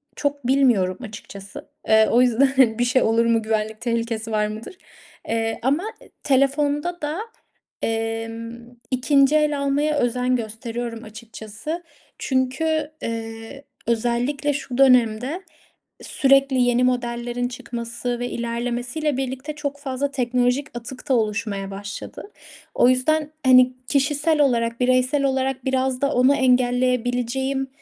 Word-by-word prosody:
çok 285 -3 -2
bilmiyorum 240 -9 +3
açıkçası. 200 -4 -9 0.2
Eee, 220 0 +5
o 240 - +5
yüzden 255 -1 +3
bir - - +3
şey 255 +1 +2
olur 230 +1 +2
mu, 230 -1 +2
güvenlik 220 0 -2
tehlikesi 230 -1 -2
var 210 -1 +1
mıdır? 215 +11 -8 0.5
Eee, 225 0 -1
ama 285 +7 +1 0.2
e - - -17
telefonda 290 +5 +1
da, 300 +4 -3 0.6
emm, 225 +1 -4 0.2
2'nci 275 +2 +3
el 300 -2 +2
almaya 290 +2 +1
özen 250 0 +1
gösteriyorum 230 0 -5
açıkçası. 220 +8 -7 0.4
Çünkü, 295 +4 0
eee, 225 +3 -6 0.2
özellikle 245 +5 0
şu 265 -3 -5
dönemde 250 +4 +3 0.6
sürekli 275 -1 +3
yeni 245 0 +3
modellerin 245 -1 -1
çıkması 240 0 -5
ve 245 0 -3
ilerlemesiyle 240 +5 -2
birlikte 265 +3 -4
çok 285 -1 -4
fazla 280 0 -3
teknolojik 250 +1 0
atık 250 +3 -9
da - - +4
oluşmaya 210 -3 -2
başladı. 200 - -8 0.4
O 245 - +5
yüzden, 295 +4 +1
hani, 255 0 +6
kişisel 295 +2 +2
olarak, 235 -4 +1
bireysel 255 +3 +2
olarak 265 -1 -1
biraz 260 -1 0
da 280 +1 +1
onu 255 +3 +4
engelleyebileceğim 250 +1 +1
250 Hz, 120 wpm, -22 LUFS, 230-275 Hz, 0.6 s, hani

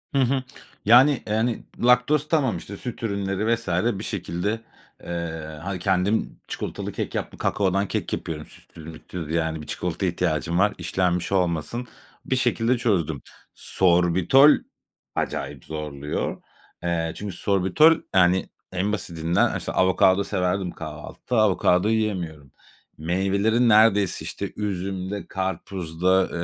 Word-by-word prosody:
Hı 135 - +4
hı. 130 +1 +1 0.4
Yani 125 +4 +6
yani, 110 +2 0 0.2
laktoz 125 +5 +4
tamam, 135 - +1
işte, 100 +4 -9
süt 120 0 -7
ürünleri 100 +1 0
vs. 115 -3 -9 0.3
bir - - -5
şekilde, 100 +2 -3 0.4
eee, 80 -3 -5
hani, 95 -2 -4
kendim 95 +3 0
çikolatalı - - -5
kek - - -4
yaptım, - - -4
kakaodan 100 0 0
kek - - -3
yapıyorum 75 -2 -4
sütsüz 80 - -14
mütsüz, 80 0 -7
yani, 80 -1 -1
1 75 - -11
çikolataya 90 +1 -2
ihtiyacım 85 -1 -1
var, 105 +1 +3
işlenmiş 90 0 -1
olmasın. 90 +6 0 0.4
Bir 130 - 0
şekilde 120 -1 +1
çözdüm. 90 - 0 0.3
Sorbitol 90 - +4 0.6
acayip - - -3
zorluyor. 75 -2 -4 0.4
Eee, 85 -2 -1
çünkü 100 -3 -6
Sorbitol, 100 - +4 0.2
yani, 90 0 +4 0.2
en 95 +3 -1
basitinden 85 -4 0
işte - - -3
avokado 95 +1 +3
severdim 90 -1 -1
kahvaltıda, 125 - -6
avokado 95 -2 +3
yiyemiyorum. 90 - -2 0.5
Meyvelerin 100 +8 +1
neredeyse 105 -3 +4
işte - - -4
üzümde, 95 -1 -3
karpuzda, 95 -1 0
95 Hz, 120 wpm, -24 LUFS, 85-110 Hz, 0.6 s, Yani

